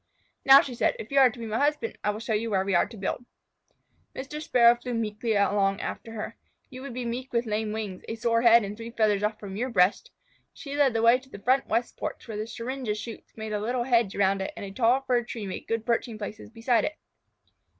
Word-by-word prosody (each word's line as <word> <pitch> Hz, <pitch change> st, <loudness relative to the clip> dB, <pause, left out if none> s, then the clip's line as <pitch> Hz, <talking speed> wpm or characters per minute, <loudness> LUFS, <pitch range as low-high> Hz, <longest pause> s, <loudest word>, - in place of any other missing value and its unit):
"Now," 270 Hz, +1 st, +9 dB
she 260 Hz, -, -6 dB
said, 235 Hz, -, +1 dB
"if 220 Hz, -, -9 dB
you 275 Hz, -, +4 dB
are 265 Hz, -2 st, +7 dB
to 235 Hz, -, -12 dB
be 230 Hz, -, -6 dB
my 220 Hz, +1 st, -2 dB
husband, 300 Hz, +10 st, 0 dB
I -, -, +1 dB
will 210 Hz, +1 st, -2 dB
show 225 Hz, 0 st, -3 dB
you 225 Hz, +2 st, -1 dB
where 190 Hz, -2 st, +1 dB
we 195 Hz, -, -1 dB
are 175 Hz, -, +3 dB
to 225 Hz, +1 st, -12 dB
build." 195 Hz, +5 st, -3 dB, 0.9 s
Mr. 280 Hz, +3 st, -6 dB
Sparrow 240 Hz, -5 st, +5 dB
flew 240 Hz, 0 st, -5 dB
meekly 220 Hz, 0 st, -1 dB
along 200 Hz, -1 st, +2 dB
after 225 Hz, -, -6 dB
her. 220 Hz, +1 st, -6 dB, 0.3 s
You 255 Hz, 0 st, -9 dB
would 270 Hz, -3 st, -7 dB
be 250 Hz, -1 st, -3 dB
meek 250 Hz, +3 st, -4 dB
with 235 Hz, 0 st, 0 dB
lame 215 Hz, 0 st, -2 dB
wings, 210 Hz, -4 st, -5 dB
a 225 Hz, -, -4 dB
sore 230 Hz, 0 st, +1 dB
head, 235 Hz, -1 st, +6 dB
and 200 Hz, +1 st, -5 dB
three 230 Hz, +1 st, -8 dB
feathers 215 Hz, -3 st, +1 dB
off 210 Hz, +1 st, -1 dB
from 195 Hz, -2 st, -7 dB
your 245 Hz, +5 st, -2 dB
breast. 200 Hz, -, +2 dB, 0.5 s
She 280 Hz, -2 st, -7 dB
led 280 Hz, -5 st, +3 dB
the 225 Hz, -, +1 dB
way 235 Hz, +2 st, +6 dB
to 265 Hz, 0 st, -20 dB
the 205 Hz, -, -9 dB
front 255 Hz, +7 st, +1 dB
west 240 Hz, +1 st, -1 dB
porch, -, -, -5 dB
where 220 Hz, -, -6 dB
the 215 Hz, +1 st, -4 dB
syringa 240 Hz, -1 st, -4 dB
shoots 225 Hz, +1 st, -9 dB
made 220 Hz, -1 st, -5 dB
a 210 Hz, -, 0 dB
little 240 Hz, +3 st, -1 dB
hedge 235 Hz, -5 st, +2 dB
around 195 Hz, 0 st, +2 dB
it 190 Hz, -, -4 dB
and -, -, -5 dB
a 195 Hz, -, -7 dB
tall 240 Hz, +5 st, +2 dB
fir 250 Hz, -3 st, +1 dB
tree 230 Hz, -2 st, -6 dB
made 190 Hz, -, -6 dB
good 225 Hz, -1 st, -2 dB
perching 235 Hz, -1 st, -1 dB
places 215 Hz, +1 st, -7 dB
beside 230 Hz, 0 st, +1 dB
it. 305 Hz, -, -3 dB
230 Hz, 245 wpm, -27 LUFS, 210-245 Hz, 0.9 s, Now